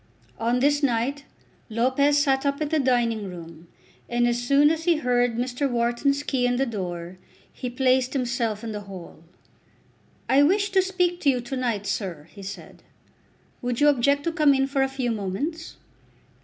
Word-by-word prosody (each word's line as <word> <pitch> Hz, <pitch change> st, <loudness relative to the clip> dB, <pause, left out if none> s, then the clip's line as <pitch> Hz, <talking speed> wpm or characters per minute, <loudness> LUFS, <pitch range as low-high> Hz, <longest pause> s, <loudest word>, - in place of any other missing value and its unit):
On 235 Hz, +2 st, +1 dB
this 290 Hz, +1 st, +3 dB
night 275 Hz, +2 st, 0 dB, 0.4 s
Lopez 260 Hz, +6 st, +2 dB
sat 270 Hz, -2 st, +2 dB
up 280 Hz, 0 st, 0 dB
in 305 Hz, -2 st, -2 dB
the 315 Hz, 0 st, +1 dB
dining 235 Hz, -6 st, +1 dB
room, 170 Hz, -1 st, -11 dB, 0.4 s
and 240 Hz, 0 st, +2 dB
as 240 Hz, 0 st, 0 dB
soon 280 Hz, +4 st, +4 dB
as 325 Hz, 0 st, -3 dB
he 345 Hz, -2 st, +4 dB
heard 245 Hz, -4 st, +1 dB
Mr. 250 Hz, +3 st, -1 dB
Wharton's 245 Hz, +4 st, 0 dB
key 255 Hz, -4 st, 0 dB
in 245 Hz, -, +1 dB
the 265 Hz, +2 st, +1 dB
door, 180 Hz, -5 st, -5 dB, 0.3 s
he 250 Hz, -, -5 dB
placed 255 Hz, 0 st, +1 dB
himself 240 Hz, -5 st, -1 dB
in 225 Hz, -, -4 dB
the 210 Hz, -1 st, -5 dB
hall. 180 Hz, -3 st, -10 dB, 1.0 s
"I 270 Hz, +2 st, +4 dB
wish 395 Hz, +7 st, +2 dB
to 385 Hz, -1 st, +4 dB
speak 360 Hz, -2 st, -1 dB
to 285 Hz, -, +3 dB
you 255 Hz, -2 st, +2 dB
to 255 Hz, +3 st, -5 dB
night, 235 Hz, -6 st, -2 dB
sir," 175 Hz, -8 st, -3 dB
he 200 Hz, -, -12 dB
said. 195 Hz, +1 st, -9 dB, 0.8 s
"Would 245 Hz, -2 st, -2 dB
you 295 Hz, 0 st, +6 dB
object 280 Hz, +1 st, +2 dB
to 335 Hz, -, -1 dB
come 305 Hz, -4 st, +4 dB
in 270 Hz, 0 st, +2 dB
for 275 Hz, 0 st, -1 dB
a 270 Hz, -, +3 dB
few 265 Hz, -3 st, -2 dB
moments?" 230 Hz, -, -4 dB
255 Hz, 180 wpm, -24 LUFS, 230-285 Hz, 1.0 s, you